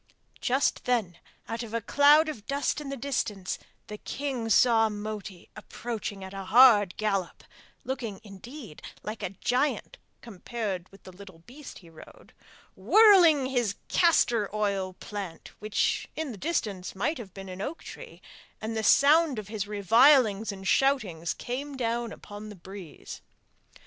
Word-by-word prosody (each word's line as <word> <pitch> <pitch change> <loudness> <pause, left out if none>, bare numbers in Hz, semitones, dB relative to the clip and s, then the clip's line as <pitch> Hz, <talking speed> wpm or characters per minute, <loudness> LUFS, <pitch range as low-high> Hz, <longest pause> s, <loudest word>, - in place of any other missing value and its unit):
Just 265 +3 0
then 220 -9 -1 0.3
out 230 +1 -4
of 230 -1 -6
a - - +1
cloud 290 +7 +5
of 230 -9 -7
dust 280 +1 -1
in 285 - -7
the 275 - -4
distance 220 -8 -3 0.3
the 210 0 -9
king 260 -5 -4
saw 225 0 +4
Moti 210 -3 -7
approaching 215 -2 -6
at 190 +1 -9
a 195 -1 -6
hard 210 -3 +6
gallop, 195 -4 -2 0.4
looking 240 -7 -5
indeed 215 - -11 0.2
like 215 +2 -6
a 195 - -2
giant 255 - -1 0.2
compared 205 -3 -5
with 195 - -18
the 185 - -11
little 190 -1 -13
beast 280 +3 -11
he - - -14
rode, 160 - -16 0.4
whirling 370 -10 +6
his 245 -6 -1
castor 240 - +3
oil 200 -3 -1
plant, 195 -4 -8
which 210 0 -1
in 315 -4 -4
the 220 - -9
distance 200 - -3
might 275 - -1
have 195 -6 -10
been 195 -1 -8
an 185 +1 -7
oak 295 +10 -5
tree, - - -11 0.4
and 220 +1 -4
the 220 - -1
sound 290 +5 +4
of 210 -2 -6
his 210 -2 -4
revilings 220 - +4
and 195 -1 -8
shoutings 195 - +1
came 275 +3 -5
down 235 -1 -2
upon 205 +1 -10
the 210 - -10
breeze! 185 -2 -10
220 Hz, 150 wpm, -27 LUFS, 195-265 Hz, 0.4 s, hard